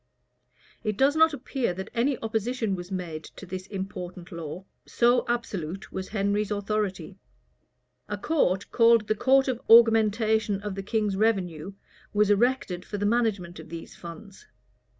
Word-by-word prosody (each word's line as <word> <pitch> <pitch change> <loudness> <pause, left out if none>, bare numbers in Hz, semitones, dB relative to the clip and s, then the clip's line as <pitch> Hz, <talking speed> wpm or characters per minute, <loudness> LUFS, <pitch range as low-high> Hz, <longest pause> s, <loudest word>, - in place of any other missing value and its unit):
[] - - -48 0.3
It 215 -2 -2
does 275 +4 +4
not 320 0 +5
appear 255 - -2
that 190 +3 -7
any 245 +3 +1
opposition 225 0 -1
was 180 0 -6
made 170 -4 -4
to - - -10
this 185 +1 -6
important 185 -2 -6
law: 170 +2 -7 0.2
so 240 +1 +2
absolute 195 -7 -3
was 190 0 -5
Henry's 205 0 0
authority[] 205 -3 -2 0.9
A 205 - -2
court, 200 - 0
called 230 -2 +5
the - - +2
court 265 +5 +3
of 250 -2 -2
augmentation 220 -2 +5
of 205 -1 -3
the 195 - -4
king's 210 0 -1
revenue, 190 -5 0 0.4
was 210 0 +3
erected 205 -5 +1
for 205 - -6
the 205 - -1
management 205 -6 0
of - - -11
these 165 0 -8
funds. 175 +4 -11
205 Hz, 150 wpm, -26 LUFS, 185-230 Hz, 0.9 s, not